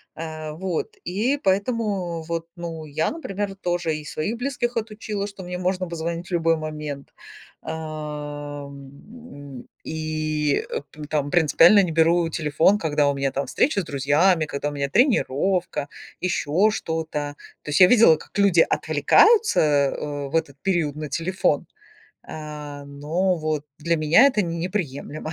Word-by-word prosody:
А, 155 -1 -6
вот, 185 - -3
и 225 +10 0
поэтому 195 - -1
вот, 165 0 -4
ну, 165 -2 -6
я, 155 +2 -1
например, 205 - -4
тоже 175 -4 -1
и 150 - -6
своих 155 +9 -3
близких 245 -1 -2
отучила, 210 -2 -3
что 200 -2 -10
мне 180 0 -5
можно 185 0 -1
позвонить 170 +1 -4
в - - -14
любой 165 -1 +2
момент, 150 -2 -6 0.5
ам, 145 - -8 0.2
и, 155 -2 -1
э, - - -3 0.3
там 145 -2 -1
принципиально 175 +4 +6
не 175 - -2
беру 165 +1 +3
телефон, 160 +5 +2
когда 150 -4 +1
у - - +1
меня 135 0 -1
там 140 +1 -2
встреча 205 - +1
с - - -6
друзьями, 155 +4 +2
когда 145 0 -3
у - - -7
меня 140 -1 -2
тренировка, 180 - +1 0.3
ещё 180 +2 +2
что-то. 160 -6 -3 0.3
То - - -8
есть 150 - +1
я 180 - +10
видела, 225 -7 +7
как - - -11
люди 195 -4 +5
отвлекаются, 450 0 +4
э, 145 -1 0
в 155 - -5
этот 145 -4 0
период 170 -7 0
на 155 0 -4
телефон, 185 +5 0 0.6
а, 150 -2 -8
но 155 +7 -1
вот 155 -2 -2
для 170 +2 0
меня 155 - +5
это 255 -6 +2
не 170 -2 -3
неприемлемо. 155 -4 -4
160 Hz, 145 wpm, -23 LUFS, 150-190 Hz, 0.6 s, я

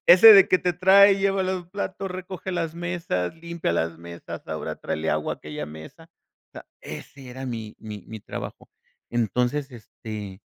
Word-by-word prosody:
Ese 185 +6 +10
de 195 -2 +8
que 185 - +4
te 180 -1 0
trae 195 +3 +7
y - - -4
lleva 195 -1 +1
los 185 -2 -2
platos, 195 0 -4
recoge 185 0 -6
las 165 -2 -2
mesas, 170 - -2
limpia 170 - -3
las 85 -1 -1
mesas, 85 0 -9
ahora - - -4
tráele 80 +1 -2
agua 75 0 -1
a - - -20
aquella 75 0 -6
mesa, 80 - -12 0.4
o - - -79
sea, - - -9 0.2
ese 135 -2 -9
era 130 +1 -7
mi 110 -3 -5
mi 105 -3 -8
mi 110 -2 -8
trabajo, - - -8 0.4
entonces, 125 +5 0
este, 105 -3 -8
145 Hz, 175 wpm, -25 LUFS, -, 0.4 s, Ese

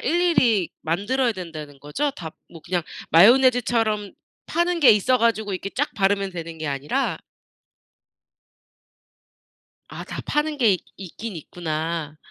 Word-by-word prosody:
일일이 295 - +2
만들어야 220 +10 0
된다는 155 -6 -8
거죠? 255 - -2
다 160 - -8 0.2
뭐 165 - -12
그냥 175 -1 -1 0.3
마요네즈처럼 225 0 +4 0.3
파는 345 0 0
게 280 - +8
있어 220 +5 +3
가지고 220 -3 +1
이렇게 190 +1 -4
쫙 290 +3 -1
바르면 195 -1 +1
되는 165 -2 -7
게 155 - -4
아니라? 145 - -1 2.7
아 - - -8
다 - - -6
파는 300 0 0
게 220 -6 +4
이 - - -21
있긴 195 +2 -7
있구나. 160 -1 -4
200 Hz, 265 characters per minute, -23 LUFS, 165-250 Hz, 2.7 s, 게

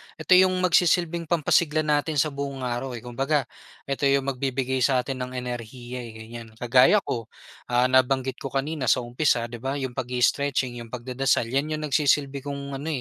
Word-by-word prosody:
eto 185 0 +4
yung 185 0 +4
magsisilbing 175 -1 +2
pampasigla 155 -1 +2
natin 150 +1 0
sa 150 +1 +2
buong 140 -1 -5
araw 125 +1 -3
eh, 115 - -9
kumbaga, 135 +4 0 0.4
eto 140 0 -1
yung 140 0 +3
magbibigay 130 0 -2
sa'tin 130 +1 +1
ng 125 0 -5
enerhiya 125 0 -6
eh, 120 -2 -7
ganyan. 115 +1 -9
Kagaya 125 - +4
ko, 115 -2 -4 0.4
ah, 125 +1 +2
nabanggit 130 0 +2
ko - - -5
kanina 135 +1 -2
sa 125 - +3
umpisa, 120 0 +1
'di 120 - -7
ba, 135 +3 -3
yung 135 -3 -3
pag-i-stretching, 125 +1 0
yung 115 - -8
pagdadasal, 125 +2 0
yan 145 +4 0
yung 155 - -5
nagsisilbi 140 -1 +1
kong 140 0 -6
ano, 145 - -6
135 Hz, 170 wpm, -25 LUFS, 125-145 Hz, 0.4 s, eto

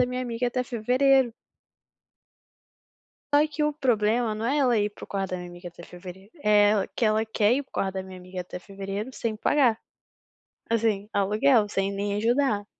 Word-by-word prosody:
da 250 - +4
minha 250 0 -3
amiga 240 0 -2
até 250 +1 -1
fevereiro. 250 +2 +2 2.0
Só 295 +1 +6
que 305 0 -3
o 300 0 +1
problema, 230 -4 +1
não 220 - -4
é 275 +5 +1
ela 250 -5 +3
ir 205 0 +1
para - - -13
o - - -8
quarto 195 -2 -3
da 185 - -2
minha 180 0 -8
amiga 175 +1 -10
até 175 0 -12
fevereiro, 185 +4 -11
é 210 -1 +5
ela 205 -2 +1
que - - -4
ela 215 +1 +2
quer 220 0 +2
ir 280 +3 0
para - - -37
o - - -51
quarto 190 -1 -1
da 190 - -3
minha 190 0 -10
amiga 185 0 -7
até 180 0 -8
fevereiro 195 +4 -6
sem 225 -3 -3
pagar, 240 -1 +2 0.9
assim 215 -3 0
aluguel, 210 +3 +3
sem 195 -1 -1
nem 200 +1 -2
ajudar. 225 -1 +1
215 Hz, 195 wpm, -26 LUFS, 195-245 Hz, 2.0 s, Só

